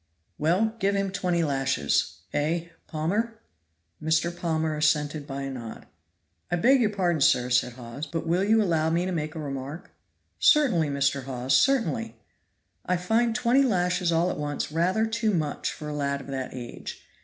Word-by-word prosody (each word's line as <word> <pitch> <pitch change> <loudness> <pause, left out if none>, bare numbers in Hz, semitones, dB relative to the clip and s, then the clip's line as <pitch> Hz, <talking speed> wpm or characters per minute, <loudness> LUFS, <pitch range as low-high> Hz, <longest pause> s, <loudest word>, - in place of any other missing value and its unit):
"Well, 190 +9 +2
give 200 -1 +1
him 195 -1 0
twenty 180 -3 0
lashes. 130 - 0
Eh: 165 +3 -1 0.2
Palmer?" 205 +9 -1 0.6
Mr. 160 +2 +1
Palmer 160 -2 -1
assented 150 -1 +1
by 140 0 -4
a 135 - -4
nod. 120 -4 -8 0.6
"I - - +1
beg 255 +9 +4
your 220 - +3
pardon, 180 -6 0
sir," 125 -2 +3
said 125 0 +2
Hawes, 125 +5 -7
"but 165 +2 -4
will 175 +3 +1
you 220 +2 +4
allow 160 -4 +1
me 170 +2 +1
to 185 - -2
make 155 -2 -3
a - - -4
remark?" 140 +2 -6 0.5
"Certainly, 245 - +4
Mr. 140 -1 0
Hawes, 130 0 0
certainly!" 230 - +2 0.7
"I 180 - 0
find 225 +6 +1
twenty 245 +2 +3
lashes 180 -7 +1
all 170 +2 +2
at - - -5
once 145 0 -3
rather 180 +7 +1
too 220 -2 0
much 150 -3 -1
for 150 - -8
a - - -4
lad 140 -1 -1
of - - -12
that 130 -1 -4
age. 120 -2 -8
165 Hz, 170 wpm, -26 LUFS, 140-195 Hz, 0.7 s, beg